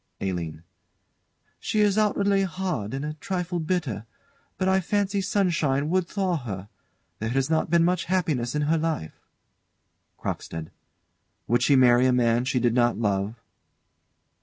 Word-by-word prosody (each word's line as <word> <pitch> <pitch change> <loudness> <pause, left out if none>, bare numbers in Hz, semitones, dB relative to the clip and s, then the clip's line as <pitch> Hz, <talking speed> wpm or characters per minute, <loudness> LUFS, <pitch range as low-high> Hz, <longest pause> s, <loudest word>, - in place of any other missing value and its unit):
ALINE. 85 -5 -4 1.0
She 215 - 0
is 205 -2 +3
outwardly 200 -2 +2
hard, 180 - -2
and 135 +2 -3
a 150 - -3
trifle 180 +2 -3
bitter, 155 - -2 0.5
but 185 - 0
I 190 0 +4
fancy 200 +1 0
sunshine 165 -8 +1
would 185 -1 +1
thaw 190 -4 0
her. 100 -7 -6 0.5
There 110 - -2
has 135 +4 0
not 160 0 +1
been 170 0 +4
much 180 0 +1
happiness 155 -9 0
in 150 - +1
her 160 +2 +2
life. 155 - -3 1.0
CROCKSTEAD. 80 -1 -5 0.7
Would 120 +1 +2
she 140 - +4
marry 125 -1 +5
a - - +4
man 120 0 +2
she 130 -1 +1
did 120 -1 +2
not 120 -1 +2
love? 100 -1 -1
150 Hz, 145 wpm, -25 LUFS, 120-185 Hz, 1.0 s, marry